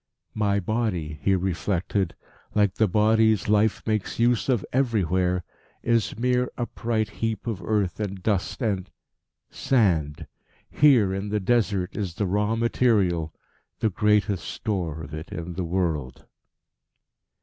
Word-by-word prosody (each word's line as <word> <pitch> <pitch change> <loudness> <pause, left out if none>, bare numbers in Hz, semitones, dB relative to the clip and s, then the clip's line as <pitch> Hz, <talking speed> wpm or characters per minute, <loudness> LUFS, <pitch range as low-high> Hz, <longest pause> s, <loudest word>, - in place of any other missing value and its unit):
"My 100 -2 +1
body," 100 -9 -2
he 95 - +3
reflected, 95 0 -1 0.4
"like 105 -3 +3
the 110 - +2
bodies 110 +2 +3
life 105 +1 +2
makes 110 -3 -1
use 120 +2 +2
of 120 -7 +1
everywhere, 95 -8 +1 0.4
is 115 -3 +1
mere 125 +1 +1
upright 115 -2 -1
heap 115 -1 -1
of 110 -5 -3
earth 105 -4 0
and 100 -3 -4
dust 105 +4 -1
and 100 -4 -1 0.6
sand. 85 - +1 0.5
Here 125 -10 +5
in 95 +2 -3
the 105 +1 0
Desert 100 -3 0
is 95 -6 -3
the 105 - -1
raw 105 +4 +1
material, 105 -9 +1 0.5
the 110 - 0
greatest 105 -1 +1
store 85 -8 -3
of 70 - -9
it 80 +2 -7
in 85 +1 -5
the 95 - -3
world." 80 -7 -2
105 Hz, 130 wpm, -25 LUFS, 90-110 Hz, 0.6 s, Here